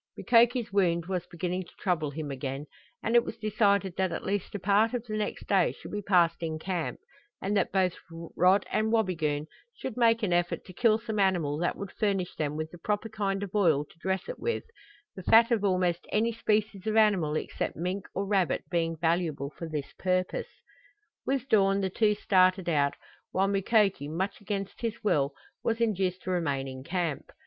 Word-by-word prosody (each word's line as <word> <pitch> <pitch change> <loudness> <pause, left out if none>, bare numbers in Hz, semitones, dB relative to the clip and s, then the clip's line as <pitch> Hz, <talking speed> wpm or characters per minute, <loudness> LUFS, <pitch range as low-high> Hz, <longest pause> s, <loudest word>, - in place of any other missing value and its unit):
Mukoki's 235 -1 +3
wound 170 -4 +2
was 180 -1 -3
beginning 180 +2 -3
to - - -19
trouble 170 -6 0
him 145 0 -5
again, 135 +1 -4 0.4
and 230 - 0
it 235 - +7
was - - -6
decided 200 -4 +1
that 190 -1 +1
at - - -4
least 200 0 -2
a - - -2
part 205 +5 +3
of 240 -1 -3
the 215 -2 -4
next 210 -1 -3
day 195 -2 +3
should - - -11
be 205 - -3
passed 175 -4 +3
in 160 -1 -2
camp, 175 0 -3 0.4
and 200 +2 -1
that 195 - +1
both 185 -2 +2 0.4
Rod 185 +3 +4
and 220 0 +1
Wabigoon 165 -9 0 0.3
should 260 - -6
make 230 -1 +4
an 185 -4 +1
effort 175 0 0
to 185 - -11
kill 220 +3 +3
some 220 -2 -4
animal 170 -7 +1
that 175 - 0
would 200 -2 -7
furnish 195 -4 -1
them 150 -1 -2
with 155 0 -4
the 175 - -12
proper 210 +4 -2
kind 200 -2 -2
of 195 - -6
oil 165 -9 +3
to 165 - -23
dress 190 +2 -2
it - - -6
with, 470 - -1 0.5
the 190 - -7
fat 225 +6 +5
of 225 -3 +2
almost 180 -3 +1
any 225 +2 +2
species 215 -2 -1
of 215 - 0
animal 190 -9 +3
except - - -3
mink 180 +4 -3
or 195 - -1
rabbit 195 -4 +1
being 165 -1 0
valuable 160 -4 0
for 165 - -6
this 150 -3 -4
purpose. 185 -1 0 0.8
With 270 -1 0
dawn 195 -5 +3
the 190 -1 -1
two 210 +1 +2
started 185 -2 +3
out, 145 -4 +2 0.3
while 195 +1 +1
Mukoki, 195 -5 +2
much 190 +7 -3
against 200 -1 -4
his 230 -2 -3
will, 140 -8 +1 0.3
was 230 0 0
induced 190 -5 0
to 185 - -3
remain 140 -7 -1
in 130 0 -7
camp. 170 -2 -3
190 Hz, 195 wpm, -29 LUFS, 170-210 Hz, 0.8 s, it